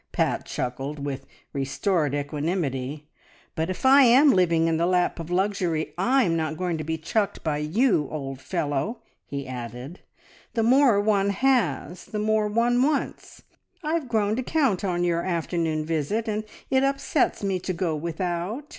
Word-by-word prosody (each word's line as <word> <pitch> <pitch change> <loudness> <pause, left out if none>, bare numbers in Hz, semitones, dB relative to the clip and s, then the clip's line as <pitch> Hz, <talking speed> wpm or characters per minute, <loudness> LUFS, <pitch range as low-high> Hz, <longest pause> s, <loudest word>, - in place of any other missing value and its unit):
Pat - - 0
chuckled, 140 +3 -4
with 140 -2 -5 0.3
restored 145 +2 0
equanimity. 145 -1 -3 0.5
"But 160 +2 -2
if 185 - -4
I 270 +2 +8
am 265 +3 +7
living 170 -5 +3
in 165 -1 +1
the 170 +1 +1
lap 180 -1 +1
of 165 0 -6
luxury 180 -4 0
I'm 205 -1 +2
not 160 -1 -2
going 175 -3 -2
to - - -3
be 160 +1 -2
chucked 200 +5 -1
by 150 -2 -1
you, 165 - +2
old 135 -3 -5
fellow," 145 - -2 0.2
he 140 -1 -5
added. 125 - -7 0.6
"The 225 - +2
more 250 -2 +5
one 205 -1 +2
has 195 - 0
the 215 - -6
more 215 0 +1
one 235 +3 +2
wants. 290 +2 -2 0.4
I've 310 -3 -1
grown 215 -2 +1
to - - 0
count 255 - +1
on 175 -2 0
your 170 -1 +1
afternoon 165 -3 -1
visit, 165 - -1
and 215 0 -2 0.3
it 265 0 +3
upsets 275 -3 0
me 195 -2 0
to 185 - -3
go 170 -2 -1
without. 175 - -3
175 Hz, 160 wpm, -25 LUFS, 155-220 Hz, 0.6 s, I